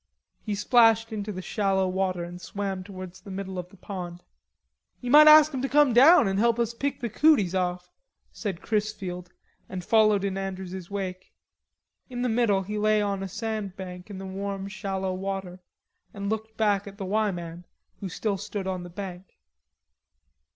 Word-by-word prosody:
He 210 -2 -3
splashed 225 +1 +4
into 210 0 -4
the 185 -2 -6
shallow 195 -1 +1
water 185 -1 -1
and 175 +1 -8
swam 195 -2 -4
towards 185 -1 -9
the 200 - -12
middle 190 -1 -5
of 180 0 -7
the 195 - -18
pond. 180 -2 -7 0.8
"Ye 245 -1 -4
might 305 +1 +9
ask 305 0 +8
'em 260 - -2
to 270 - -1
come 290 -3 +4
down 270 - +7
and 195 0 0
help 235 +1 +3
us 235 -1 0
pick 275 +3 -3
the 240 - -1
cooties 225 - +3
off," 180 -1 -2 0.4
said 195 -6 -5
Chrisfield 195 -4 -3 0.4
and 185 -2 -6
followed 215 -3 +4
in 195 -1 -2
Andrews's 190 -2 -6
wake. 185 -2 -5 0.8
In 245 -1 -4
the 250 - +1
middle 220 -4 +2
he 210 +2 -4
lay 215 0 +3
on 200 -2 -1
a 195 - -3
sand 215 -1 -4
bank 180 0 -8
in 200 - -7
the 190 - -7
warm 195 +1 -4
shallow 195 -2 -3
water 190 -1 -4 0.6
and 200 0 -3
looked 220 0 -4
back 205 -2 +1
at 200 0 -10
the 195 - -5
"Y" 215 +2 +1
man, 175 -2 -6 0.4
who 195 - -5
still 200 +2 -2
stood 205 0 -5
on 185 -1 -3
the 175 - -8
bank. 185 0 -8
195 Hz, 180 wpm, -26 LUFS, 185-220 Hz, 0.8 s, might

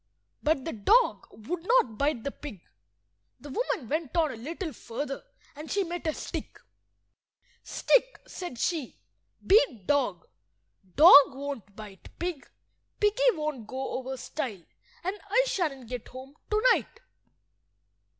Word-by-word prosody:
But 300 -3 +1
the 325 - -3
dog 435 - +3
would 330 +11 -6
not 365 - +2
bite 280 -5 0
the 280 - -2
pig. 270 - -9 0.8
The 290 - -10
woman 305 - -2
went 310 +3 -2
on 315 -3 +3
a - - -7
little 315 - -5
further, 275 +4 -5 0.3
and 300 +2 -9
she 400 - +1
met 350 -1 -5
a 315 - +1
stick. - - -6 1.0
"Stick," - - +1
said 350 -9 -7
she, 315 -1 -2 0.5
"beat 320 - +4
dog. 250 -11 +1 0.7
Dog 285 -3 +9
won't 270 -8 -6
bite 210 -3 -11
pig, 345 -5 -4 0.5
piggy 435 +5 +4
won't 300 - -4
go 265 +2 -4
over 265 +1 -4
stile, 250 - -5 0.4
and 380 +4 -3
I 485 +5 +4
shan't 285 - -2
get 250 -1 -6
home 260 +2 -11 0.2
to–night." 470 +2 +2
290 Hz, 130 wpm, -28 LUFS, 255-355 Hz, 1.0 s, Dog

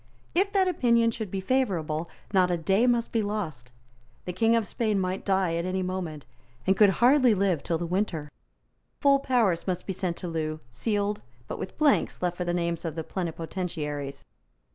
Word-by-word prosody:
If 390 +3 +2
that 385 -2 +3
opinion 235 -9 +3
should 220 -3 -5
be 190 +1 -3
favourable, 175 -10 0 0.2
not 185 -2 +4
a 175 - +1
day 195 +8 +2
must 240 -1 +1
be 225 - +1
lost. 165 - -4 0.5
The 180 - -4
King 225 +5 +3
of 230 -2 +1
Spain 215 -1 0
might 185 0 -2
die 190 -3 +1
at 170 - -2
any 185 0 -1
moment, 180 -5 -4 0.4
and 190 - +4
could 205 0 +6
hardly 245 +4 +5
live 190 -6 +1
till 165 - -1
the 170 - -3
winter. 170 -5 -2 0.7
Full 280 -1 +5
powers 230 -11 +1
must 180 -2 -2
be 190 - -2
sent 180 -2 -2
to 180 - -5
Loo, 155 -2 -2
sealed, 205 - -1 0.3
but - - -5
with 185 - -6
blanks 300 -3 +2
left 180 -1 -1
for 180 - -3
the 175 - 0
names 170 -1 -1
of 165 -3 -4
the 160 - -3
plenipotentiaries. 160 -5 -4
185 Hz, 185 wpm, -27 LUFS, 170-225 Hz, 0.7 s, could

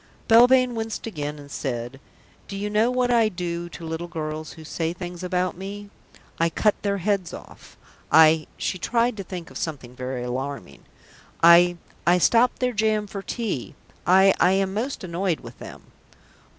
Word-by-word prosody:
Belvane 250 +2 +6
winced 225 -1 -4
again, 150 -8 -5
and 145 -1 -12
said, 120 0 -4 0.5
"Do 195 - -6
you 205 +1 -3
know 215 +3 +3
what 250 -1 +1
I 230 -2 +4
do 175 -2 -4
to 170 - -9
little 165 +2 -4
girls 155 -2 -5
who 160 - -12
say 165 +1 -3
things 175 -1 -7
about 180 0 -1
me? 200 +2 -8 0.5
I 165 0 +3
cut 210 +5 +2
their 200 -1 0
heads 195 -2 -1
off; - - -14 0.3
I 160 -1 +6
" - - -32
She 185 - -2
tried 235 +5 +1
to 195 - -4
think 175 -2 -8
of - - -7
something 130 -6 -5
very 125 0 -4
alarming! 125 - -5 0.6
"I 175 +1 +7 0.3
I 175 +1 +6
stop 235 +7 +3
their 250 -1 0
jam 215 -1 +1
for 200 -1 -7
tea. 200 - -4 0.3
I 190 +1 +6
I 180 +2 +4
am 195 0 0
most 235 +5 -3
annoyed 175 -1 -2
with - - -12
them." - - -10
180 Hz, 175 wpm, -24 LUFS, 160-210 Hz, 0.6 s, I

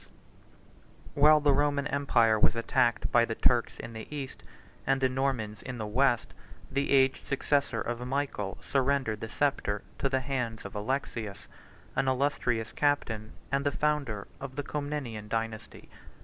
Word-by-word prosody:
] - - -27 0.3
While 150 +1 +6
the 145 -1 +4
Roman 145 -1 +2
empire 120 -6 +3
was 110 - +4
attacked 115 0 +1
by 120 - +5
the 115 -1 -2
Turks 120 0 +2
in 115 - -7
the 110 -1 -7
East, 140 -3 -6
east, - - -25 0.4
and 135 0 +3
the 130 - +3
Normans 130 -5 -1
in 130 -1 -6
the 110 - -3
West, 120 +2 +2 0.4
the 140 +1 0
aged 135 -1 +3
successor 140 -3 +1
of 120 +2 -3
Michael 130 -7 -2
surrendered 135 -5 +1
the 110 - -5
sceptre 110 -8 0 0.2
to 135 - +1
the 130 0 +1
hands 125 -5 -3
of 100 - -7
Alexius, 110 -2 -3 0.5
an 135 - +1
illustrious 125 -4 0
captain, 115 -7 0 0.2
and 140 0 +1
the 145 - +2
founder 140 -9 -1
of 135 -1 -7
the 145 - -2
Comnenian 145 -8 -4
dynasty. 115 -1 -4
130 Hz, 160 wpm, -29 LUFS, 115-140 Hz, 0.5 s, While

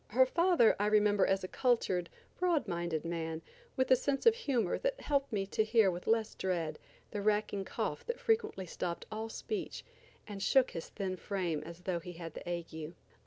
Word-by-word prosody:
Her 260 +4 +5
father 335 -4 +4
I 205 - +2
remember 210 -1 +4
as 195 0 +1
a - - -2
cultured, 190 -8 +1 0.3
broad 350 -6 +2
minded 170 -2 -2
man, 165 -1 -3 0.3
with 260 -1 +1
a - - +10
sense 275 +2 -1
of 460 - +8
humor 260 - 0
that - - -1
helped 280 -2 0
me 200 -3 0
to 210 +2 +1
hear 220 -3 +4
with 175 0 -7
less 225 -1 +2
dread 170 -5 -2 0.3
the 205 - -3
racking 210 -1 +1
cough - - -3
that 475 +1 -2
frequently 445 - 0
stopped 170 0 -4
all 220 +1 -4
speech 410 - -4 0.4
and 205 -2 -7
shook 260 +5 +4
his 165 - -6
thin 190 -2 -3
frame 175 -6 -2
as 170 +2 -10
though 180 -1 -1
he 175 +1 -8
had 165 -2 -7
the - - -7
ague. 165 -1 -5
200 Hz, 190 wpm, -33 LUFS, 175-255 Hz, 0.4 s, a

